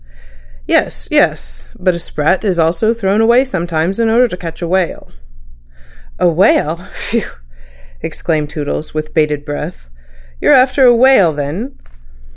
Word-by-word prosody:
"Yes. - - 0
Yes. - - 0
But 185 0 +1
a 170 - -4
sprat 165 +3 -1
is 190 -5 0
also 170 +7 +1
thrown 215 -2 0
away 240 +4 +4
sometimes 175 -3 -2
in 230 -1 +2
order 240 +3 +4
to 180 - -5
catch 165 -2 -8
a - - -2
whale." 185 0 -2 1.1
"A - - +2
whale. 170 -2 +2
Phew!" 230 -1 -3 0.8
exclaimed 155 -3 -3
Toodles, 150 0 -5
with 155 0 -4
bated 150 -2 0
breath. 145 - -7 0.5
"You're - - +3
after 260 +1 +4
a 240 -1 +6
whale, 235 -9 +4
then?" 160 - -5
175 Hz, 140 wpm, -15 LUFS, 155-225 Hz, 1.1 s, a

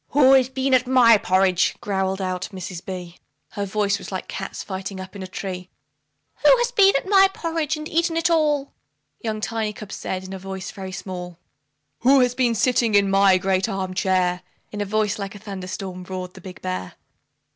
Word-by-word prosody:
"WHO 270 -1 +6
HAS 260 -2 +5
BEEN 265 0 -1
TO 255 0 +3
MY 235 -4 +6
PORRIDGE?" 185 -1 +2
growled 190 -1 -1
out 185 -1 -3
Mrs. 185 -2 -7
B; 180 -2 -7 0.3
Her 200 -1 -3
voice 200 0 0
was - - -9
like 185 - -4
cats 195 0 -6
fighting 190 0 -6
up 185 +1 -9
in 200 - -7
a 185 - -5
tree. 185 -1 -6 0.7
"WHO - - +7
HAS 485 0 0
BEEN 395 -4 +5
TO 275 - 0
MY 390 -1 +6
PORRIDGE 325 -4 -2
AND 305 0 -6
EATEN 330 0 0
IT 330 +1 +2
ALL?" 295 -4 +1 0.5
Young 220 -2 -3
Tiny 220 -1 -2
cub 210 -1 -10
said, 185 -1 -4
in 190 +1 -8
a 190 - -6
voice 190 0 -6
very 190 -1 -7
small, 180 -2 -7 0.6
"WHO 270 +2 +5
HAS 250 -1 +2
BEEN 245 -2 +1
SITTING 230 0 +2
IN 200 -1 +4
MY 195 -1 +5
GREAT 190 +2 0
ARM 190 -2 -3
CHAIR?" 185 -2 +1 0.3
In 205 -1 -2
voice 210 0 0
like 195 0 -5
a - - -7
thunder 195 -3 -7
storm, 185 -1 -6
roared 185 -1 -6
the 190 - -13
big 185 0 -11
bear. 90 0 -4
195 Hz, 200 wpm, -23 LUFS, 185-250 Hz, 0.7 s, WHO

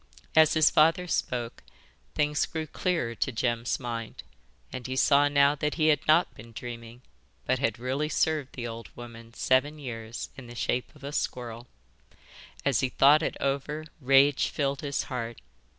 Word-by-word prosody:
As 160 0 +6
his 155 -1 +5
father 165 +4 +4
spoke, 120 -7 -2 0.5
things 150 0 +1
grew 160 -1 -4
clearer 165 -7 -1
to 135 - -2
Jem's 120 0 -1
mind, 115 - -6 0.5
and 125 - -5
he 130 - -3
saw 140 +2 +4
now 140 0 +4
that 150 0 -2
he 155 -1 +3
had 145 -2 +1
not 160 +3 +4
been 115 +1 -13
dreaming, 120 +1 -8 0.4
but 130 0 +1
had 115 -5 0
really 130 +5 -2
served 155 -4 0
the 120 - -5
old 115 0 -7
woman 115 -1 -11
seven 135 +4 +2
years 115 -5 -6
in 130 -3 -10
the 120 - -10
shape 125 +4 -2
of 145 - -17
a 140 - -5
squirrel. 120 -4 -4 1.0
As 140 -3 +2
he 130 - 0
thought 145 +5 +5
it - - -2
over 140 +3 -2
rage 135 +1 +4
filled 140 -1 -2
his 140 -2 -2
heart. 120 -2 -5
135 Hz, 165 wpm, -28 LUFS, 120-150 Hz, 1.0 s, As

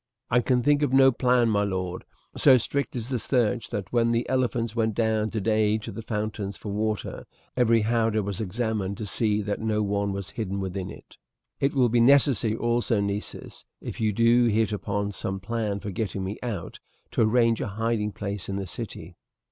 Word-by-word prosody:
"I 125 - +5
can 125 0 +1
think 145 +2 +3
on 135 -2 +3
no 135 0 +7
plan, 125 -1 +2
my 105 -1 +2
lord. 95 -2 -3 0.3
So 135 -3 +6
strict 140 +4 -2
is 120 0 -4
the 125 -3 -1
search 120 -2 0
that 100 +1 -5
when 115 -1 +3
the 115 +1 0
elephants 120 -3 0
went 110 -2 0
down 110 -1 +1
today 110 0 +1
to 110 - -7
the 115 - -7
fountains 105 -3 -3
for 105 - -7
water 105 -1 -3 0.3
every 115 -2 +4
howdah 110 -1 +1
was 100 +1 -4
examined 105 -1 -2
to 110 - -5
see 105 +1 0
that 100 0 -2
no 110 -1 0
one 100 0 0
was 100 0 -5
hidden 100 -3 -3
within 95 -1 -4
it." - - -13 0.4
"It 140 +1 +1
will 130 -3 +4
be 120 +1 +2
necessary 125 -4 +4
also, 120 -1 +1
Nessus, 100 +1 -4 0.2
if - - -7
you 110 -1 +2
do 115 +3 +4
hit 110 -1 +2
upon 100 0 -2
some 95 0 -4
plan 105 0 -2
for 100 - -5
getting 95 0 -3
me 95 +3 -4
out, 120 -5 -5 0.3
to - - 0
arrange 115 0 +3
a - - -2
hiding 110 +1 -1
place 100 -2 -5
in 100 - -2
the 100 0 -3
city." - - -7
110 Hz, 195 wpm, -26 LUFS, 100-120 Hz, 0.4 s, no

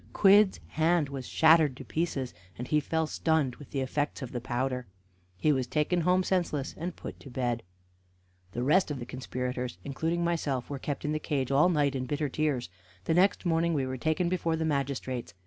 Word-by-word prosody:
Quidd's 200 0 +5
hand 160 -2 +2
was 135 -3 -6
shattered 160 -4 +5
to - - -9
pieces, 150 - -2 0.2
and 125 - -5
he 150 - +4
fell 160 +2 0
stunned 155 -5 0
with 145 - -12
the 135 - -2
effects 145 +2 -2
of 125 - -6
the 120 - -4
powder. 125 +1 -2 0.5
He 155 +11 +3
was 130 -3 0
taken 155 +6 +1
home 180 +2 +3
senseless, 170 -7 -1
and 170 +2 -5
put - - -8
to 140 - -11
bed. 120 -2 -1 0.9
The 120 - -2
rest 160 +8 +4
of 145 - -3
the 120 - -6
conspirators, 125 -2 -4
including 165 +5 -1
myself, 145 -7 -1
were 140 - -3
kept 145 +1 -4
in 150 - 0
the 155 - 0
cage 140 -4 -1
all 145 +6 +5
night 145 -5 +2
in 130 -1 -3
bitter 145 +1 -1
tears. 145 -3 -1 0.4
The - - +2
next 185 +3 +3
morning 165 0 +2
we 135 -2 +1
were 130 0 -3
taken 160 +6 0
before 170 -2 0
the 160 0 -1
magistrates. 135 - -2
145 Hz, 200 wpm, -29 LUFS, 130-165 Hz, 0.9 s, Quidd's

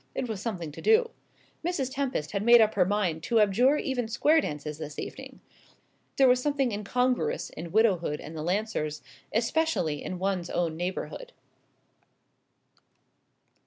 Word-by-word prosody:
It 255 - -2
was 215 -4 -4
something 180 -9 -4
to - - -10
do. 450 +2 +4 0.5
Mrs. 285 -7 -2
Tempest 260 - -2
had 200 - -1
made 235 +2 +7
up 220 -1 +4
her 185 -3 +3
mind 185 -5 0
to 230 +7 +1
abjure 235 +8 +4
even 250 -5 -2
square 295 +8 +3
dances 150 - -5
this 150 -2 -7
evening. - - -8 0.7
There 270 - +5
was 250 0 +4
something 280 -3 0
incongruous 250 - -1
in 170 0 -8
widowhood 185 -8 +2
and 160 - -9
the 155 - -4
Lancers; 175 -4 -2 0.3
especially 225 - 0
in 185 - -4
one's 185 -2 -2
own 170 -2 -1
neighbourhood. 185 - -5
215 Hz, 145 wpm, -28 LUFS, 175-260 Hz, 0.7 s, made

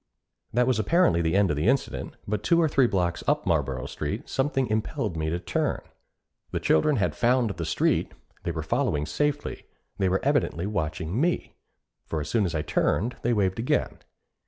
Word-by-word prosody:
That 125 +2 +3
was 130 -3 +1
apparently 110 - +3
the 80 +2 +1
end 100 -3 +4
of - - 0
the 75 +7 0
incident; 135 +1 0
but 105 +1 -1
two 170 -1 +3
or 165 - +4
three 135 -4 +3
blocks 90 -5 -1
up - - +1
Marlboro 65 -5 0
Street, - - -4
something 135 -1 0
impelled 110 -3 -2
me 80 -1 -1
to 85 - -1
turn. 90 - -1 0.7
The - - -2
children 140 - +3
had 105 - +1
found 120 -2 +2
the 85 -3 -4
street, 80 - +1 0.3
they - - -3
were 80 -1 -4
following 75 -1 0
safely, 145 - -2 0.3
they 95 -1 +2
were 95 +1 +2
evidently 140 - +1
watching 80 - -2
me; 175 +2 0 0.5
for 80 - -2
as 75 - -4
soon 110 -4 +2
as 85 -2 -2
I 75 - 0
turned, 110 +8 0
they 120 - +1
waved 100 -3 +1
again. 115 - 0
100 Hz, 185 wpm, -26 LUFS, 80-125 Hz, 0.7 s, end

